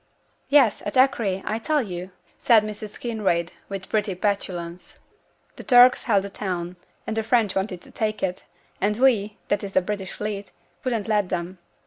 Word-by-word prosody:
'Yes, 275 -8 +5
at 205 - -3
Acre, 225 -8 +2
I 220 - -1
tell 300 +3 +1
you,' 180 -3 -6 0.3
said 225 -3 +5
Mrs. 215 0 -7
Kinraid, 195 -8 -1 0.2
with 195 -1 -6
pretty 210 -3 0
petulance. 180 -3 -3 0.6
'The - - -8
Turks 250 0 +6
held 205 -5 +3
the 200 - -5
town, 180 -3 -4 0.3
and 220 - -3
the 225 - +1
French 220 -3 +2
wanted 190 -2 -2
to - - -13
take 215 -2 -2
it; 185 -1 -2 0.4
and 210 +1 +1
we, 220 -5 +2
that 205 0 +1
is 195 -1 -6
the 185 - +5
British 190 -1 -4
Fleet, 205 -1 -4 0.3
wouldn't 235 -5 -1
let 210 -4 +1
them. 175 +2 -4
205 Hz, 170 wpm, -24 LUFS, 190-220 Hz, 0.6 s, Turks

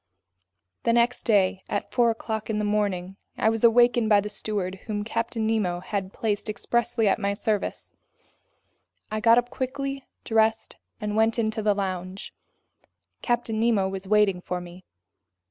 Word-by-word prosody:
The 230 - +2
next 240 +1 +2
day 195 -4 +3
at 205 - -3
four 240 -1 +3
o'clock 220 -1 -3
in 215 - 0
the 210 - 0
morning, 195 -3 -1 0.2
I 220 - +3
was 225 0 -2
awakened 240 -1 +5
by 205 -1 +6
the 210 +1 -3
steward 195 -3 -3
whom 205 -2 -2
Captain 230 0 -2
Nemo 210 -6 0
had 190 +1 -4
placed 215 0 -2
expressly 235 +1 0
at 195 - +2
my 200 -1 -1
service. 210 -1 -2 1.2
I 215 - -1
got 230 +2 +5
up 245 0 +1
quickly, 275 +1 -4 0.2
dressed, 225 0 +1 0.2
and 210 -2 -3
went 220 +1 +2
into 220 -1 0
the 210 -1 +2
lounge. 185 -1 -4 0.9
Captain 235 -2 -1
Nemo 220 -4 +2
was 190 0 -6
waiting 205 -3 +3
for 180 0 -3
me. 180 +1 -11
215 Hz, 155 wpm, -25 LUFS, 195-230 Hz, 1.2 s, by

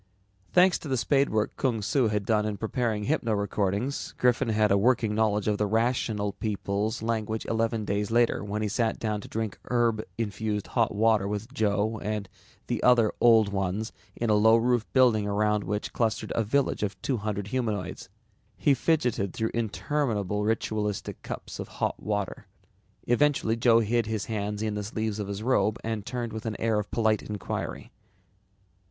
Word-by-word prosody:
Thanks 180 0 +5
to - - -8
the 130 -2 0
spade 135 +4 +2
work 110 -1 0
Kung 125 -5 0
Su 130 +3 +2
had 105 -2 -1
done 110 -1 +2
in 105 -1 -2
preparing 110 0 -1
hypno 115 -3 0
recordings, 100 +5 -1
Griffin 125 -1 +2
had 105 -1 +2
a 100 - +5
working 115 -1 +2
knowledge 105 -1 +1
of 105 -1 +1
the 105 - +1
Rational 110 -2 0
People's 105 +1 -2
language 110 -1 -2
eleven 115 -1 0
days 100 0 -1
later 115 -1 +2
when 105 +1 -3
he - - 0
sat 110 +2 0
down 105 -2 -2
to - - -10
drink 110 -2 -4
herb 115 -3 +1
infused 105 -2 -2
hot 115 -4 0
water 110 -2 +3
with 105 +5 -4
Joe 110 -2 0
and 105 -1 -3 0.5
other 120 -4 +5
Old 115 -3 +6
Ones 95 +3 -2 0.2
in 115 - -2
the 105 - +5
low 110 +2 +6
roofed 120 -1 +1
wooden - - -39
building 120 -6 +4
around 105 0 +1
which 105 +3 -3
clustered 110 -2 -1
a 115 - +1
village 140 +6 0
of 100 -2 -2
two 130 - 0
hundred 105 -1 -3
humanoids. 110 -7 -3 0.5
He 145 - +3
fidgeted 125 - 0
through 110 0 -1
interminable 110 -3 -1
ritualistic 105 -2 -2
cups - - -7
of - - -5
hot - - -1
water. 105 -2 -3 0.6
Eventually 120 -2 +2
Joe 115 0 +4
hid 115 +1 +1
his 110 -2 -2
hands 105 -1 -3
in 110 -1 -1
the 105 0 -3
sleeves 110 0 -3
of 105 - -3
his 100 +1 -5
robe 110 -4 +2
and 110 -2 -3
turned 120 0 -4
with 110 +1 -5
an 110 - -4
air 110 -2 +1
of 105 - -5
polite 110 -2 +1
inquiry. 105 -2 -5
110 Hz, 175 wpm, -27 LUFS, 105-115 Hz, 0.6 s, Old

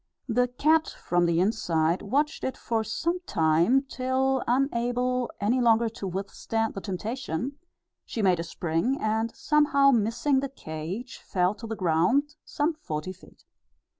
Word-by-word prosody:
The 250 +1 +2
cat, 310 +6 +2
from 175 0 0
the 170 0 +2
inside, 175 -4 +1
watched 290 +9 0
it 260 - -2
for 225 -1 -1
some 335 - -1
time 165 - +3
till, 265 0 0
unable 250 -1 0
any 235 +5 +1
longer 230 -1 +4
to 210 -3 -6
withstand 200 +4 -2
the 195 - -6
temptation, 225 - -4 0.5
she 225 - -4
made 185 -3 +3
a - - -1
spring, 170 +9 -1
and, 220 +1 0
somehow 285 -2 +4
missing 240 +4 +2
the 275 0 -3
cage, 180 - -6
fell 180 +1 0
to 225 +2 -9
the 225 - -3
ground, 190 - +2
some 305 +3 -1
forty 185 - -5
feet. 185 - -19
230 Hz, 145 wpm, -27 LUFS, 185-265 Hz, 0.5 s, longer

